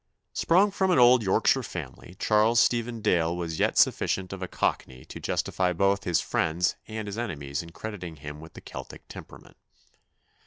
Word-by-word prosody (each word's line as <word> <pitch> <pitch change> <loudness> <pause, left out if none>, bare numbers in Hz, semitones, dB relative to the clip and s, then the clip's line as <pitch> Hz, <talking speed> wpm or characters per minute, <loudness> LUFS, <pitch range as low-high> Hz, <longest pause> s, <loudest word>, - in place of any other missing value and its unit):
Sprung 190 +5 +3
from 190 -1 0
an 180 - +3
old 125 0 +7
Yorkshire 110 +6 +2
family, 85 - -8
Charles 110 +2 +3
Stephen 120 -1 +1
Dale 85 -5 +1
was 80 -2 -4
yet - - +1
sufficient 95 0 +2
of 95 - -7
a 95 - -3
Cockney 65 -6 -2
to - - -9
justify 90 -1 -1
both 100 +3 +1
his 90 -2 +2
friends 85 +3 0
and 110 -1 -5
his 100 +3 -5
enemies 70 -12 -4
in 85 - -11
crediting 90 -2 -7
him 75 0 -9
with 80 +1 -12
the - - -11
Celtic - - -10
temperament. - - -12
95 Hz, 170 wpm, -27 LUFS, 85-115 Hz, -, old